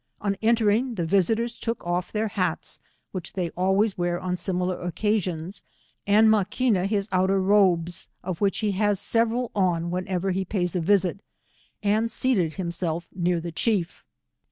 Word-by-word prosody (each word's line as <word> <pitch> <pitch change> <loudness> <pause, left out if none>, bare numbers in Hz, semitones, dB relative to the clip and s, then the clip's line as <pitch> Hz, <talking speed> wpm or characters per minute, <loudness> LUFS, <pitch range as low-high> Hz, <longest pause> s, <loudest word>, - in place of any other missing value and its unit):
On 200 -1 -1
entering, 230 +2 +2
the 175 -4 -1
visitors 225 +7 +1
took 230 0 -3
of 175 +1 -1
their 215 0 -1
hats, 200 -3 -2 0.3
which 185 -3 -6
they 175 -3 -2
always 190 +2 +1
wear 175 0 0
on 180 -1 -2
similar 180 0 -1
oc 175 -1 -4
casions, 190 -4 -1 0.5
and 215 +2 +5
Maquina 215 -1 +2
his 200 -1 -1
outer 190 +1 +2
robes, 185 -4 +2
of 180 -1 -4
which 200 -1 +2
he 205 - +2
has 205 0 +1
several 230 +1 +1
on 175 -4 +1
whenever 185 +1 -1
he 190 +1 -1
pays 180 -2 -2
a 180 - +1
visit, 190 +1 +2 0.6
and 215 +3 +2
seated 205 -10 +1
himself 170 -2 -3
near 175 -1 0
the 170 +1 -5
chief. 180 0 -1
190 Hz, 155 wpm, -25 LUFS, 175-210 Hz, 0.6 s, and